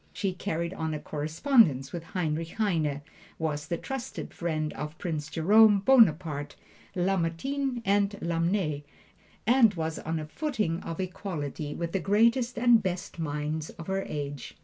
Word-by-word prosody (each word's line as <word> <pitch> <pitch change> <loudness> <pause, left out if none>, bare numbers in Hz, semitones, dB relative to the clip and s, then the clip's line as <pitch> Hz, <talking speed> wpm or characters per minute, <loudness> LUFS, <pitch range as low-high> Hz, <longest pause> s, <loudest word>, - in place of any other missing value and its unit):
She 195 -2 -1
carried 170 -2 -3
on 160 -3 -3
a - - -4
correspondence 155 - +2
with 170 - -3
Heinrich 165 -1 -3
Heine, 160 -9 0 0.3
was 150 -2 -2
the 170 - -1
trusted 265 +4 -6
friend 155 -3 -2
of 150 +3 -6
Prince 155 -3 -3
Jerome 205 +6 +6
Bonaparte, 165 - +3 0.4
Lamartine 195 +9 -1
and 200 +1 +2
Lamennais, 170 -2 0 0.6
and 230 -3 +5
was 160 -1 -3
on 160 +1 -3
a 155 - -4
footing 205 - -2
of 165 - -6
equality 170 -6 -4
with 170 -1 -3
the 195 - 0
greatest 230 +7 +2
and 235 -1 +5
best 180 -2 -4
minds 150 0 -2
of 165 - -10
her 190 +2 -1
age. 145 -2 -5
170 Hz, 145 wpm, -28 LUFS, 155-205 Hz, 0.6 s, Jerome